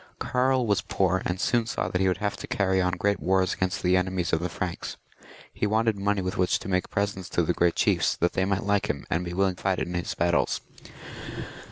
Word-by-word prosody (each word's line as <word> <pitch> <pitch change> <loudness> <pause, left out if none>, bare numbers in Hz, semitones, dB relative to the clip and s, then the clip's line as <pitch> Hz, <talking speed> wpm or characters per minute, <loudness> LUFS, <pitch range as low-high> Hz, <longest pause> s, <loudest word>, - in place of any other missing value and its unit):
Karl 130 0 +1
was 100 -3 +2
poor, 95 -1 +1
and 90 +1 -1
soon 115 +2 +1
saw - - -1
that 90 - -1
he 95 - +3
would 90 -1 +1
have 105 +1 -1
to - - -7
carry 95 -1 +1
on 90 0 +1
great 100 +2 +1
wars 95 0 +2
against 95 -1 -2
the 90 0 +4
enemies 90 -1 0
of 80 - +3
the 90 +2 -2
Franks. 85 +1 -4 0.6
He 105 - 0
wanted 110 +1 +2
money 100 -1 0
with 90 +2 -3
which 90 -1 +3
to - - -7
make 90 -1 0
presents 100 -3 -2
to 85 - +1
the 90 - +1
great 85 -1 +2
chiefs, - - +2
that 85 - 0
they 95 - +1
might 100 0 0
like 100 +1 +1
him, 70 - -2
and 85 +2 +1
be 85 0 -5
willing 95 0 +1
to - - -13
fight 95 -1 +1
in 90 - -3
his 90 -1 -2
battles. 85 0 +1
95 Hz, 235 wpm, -26 LUFS, 90-100 Hz, 0.6 s, the